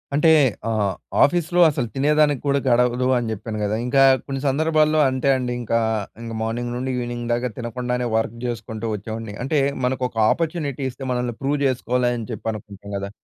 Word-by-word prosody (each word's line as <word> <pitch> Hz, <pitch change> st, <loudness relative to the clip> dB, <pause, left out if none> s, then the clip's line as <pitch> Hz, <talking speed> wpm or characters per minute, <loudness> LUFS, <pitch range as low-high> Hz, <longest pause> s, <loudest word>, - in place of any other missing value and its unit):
అంటే 155 Hz, +3 st, +4 dB, 0.4 s
ఆహ్, 105 Hz, -3 st, 0 dB, 0.3 s
ఆఫీస్‌లో 175 Hz, +3 st, +2 dB
అసలు 135 Hz, -6 st, -2 dB
తినే 140 Hz, +3 st, +2 dB
దానికి 145 Hz, -4 st, +3 dB
కూడా 140 Hz, 0 st, +2 dB
గడవదు, 125 Hz, +1 st, +3 dB
అని 120 Hz, -2 st, -2 dB
చెప్పాను 110 Hz, +1 st, -5 dB
కదా! 105 Hz, +1 st, 0 dB
ఇంకా 135 Hz, +2 st, +4 dB, 0.2 s
కొన్ని 135 Hz, -1 st, -3 dB
సందర్భాల్లో 155 Hz, +2 st, +2 dB
అంతే 130 Hz, +1 st, 0 dB
అండి 125 Hz, -1 st, -2 dB
ఇంకా, 115 Hz, 0 st, +1 dB, 0.4 s
ఇంకా 115 Hz, -1 st, -6 dB
మార్నింగ్ 120 Hz, +2 st, -3 dB
నుండి 130 Hz, +2 st, -2 dB
ఈవెనింగ్‌ 120 Hz, -1 st, -4 dB
దాకా 120 Hz, +1 st, -1 dB
తినకుండానే 125 Hz, +1 st, -2 dB
వర్క్ 110 Hz, +1 st, -2 dB
చేసుకుంటూ 115 Hz, -1 st, -5 dB
వచ్చేవాడిని. 110 Hz, 0 st, -6 dB
అంటే 145 Hz, +3 st, +1 dB, 0.3 s
మనకు 130 Hz, 0 st, 0 dB
ఒక 115 Hz, -, -15 dB
ఆపర్చునిటీ 155 Hz, -5 st, -2 dB
ఇస్తే, 130 Hz, +2 st, -10 dB
మనల్ని 125 Hz, -2 st, -1 dB
ప్రూవ్ 140 Hz, +2 st, 0 dB
చేసుకోవాలి, 125 Hz, -1 st, 0 dB
అని 115 Hz, -, -7 dB
చెప్పి 110 Hz, +1 st, -4 dB
అనుకుంటాం 105 Hz, -2 st, -10 dB
కదా! 100 Hz, 0 st, -4 dB
125 Hz, 170 wpm, -22 LUFS, 115-140 Hz, 0.4 s, అంటే